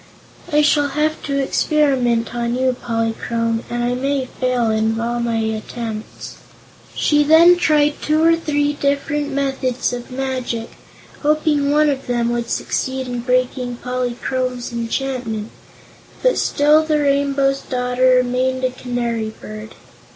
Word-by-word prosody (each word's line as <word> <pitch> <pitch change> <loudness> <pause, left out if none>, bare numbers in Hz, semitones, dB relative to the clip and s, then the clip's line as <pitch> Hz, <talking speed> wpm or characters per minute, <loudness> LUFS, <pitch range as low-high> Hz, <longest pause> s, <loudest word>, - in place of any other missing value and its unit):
"I 300 0 +4
shall 290 -1 +3
have 300 +2 -1
to 280 -1 -1
experiment 265 -5 +1
on 235 0 -1
you, 255 0 +1
Polychrome, 230 -1 -2
and 240 0 -2
I 245 +1 0
may 270 +1 -1
fail 250 -3 0
in 220 +1 0
all 235 +1 -1
my 235 -1 -1
attempts." 220 0 -5 0.6
She 295 -1 +3
then 325 +4 +7
tried 300 -4 +2
two 310 +1 +1
or 330 0 +5
three 290 -3 0
different 290 +1 -1
methods 270 -3 -1
of 245 0 -6
magic, 255 -3 -3 0.5
hoping 300 -1 +2
one 300 +1 +4
of 275 -2 -2
them 240 -1 0
would 235 0 -2
succeed 260 0 -2
in 245 -1 -3
breaking 250 0 0
Polychrome's 250 0 -3
enchantment, 235 -2 -3 0.7
but - - +3
still 300 +2 +3
the 310 -1 +1
Rainbow's 275 -1 +1
Daughter 250 0 +1
remained 255 +1 0
a 255 - +1
Canary 240 -3 -3
Bird. 215 +1 -9
255 Hz, 135 wpm, -19 LUFS, 240-285 Hz, 0.7 s, then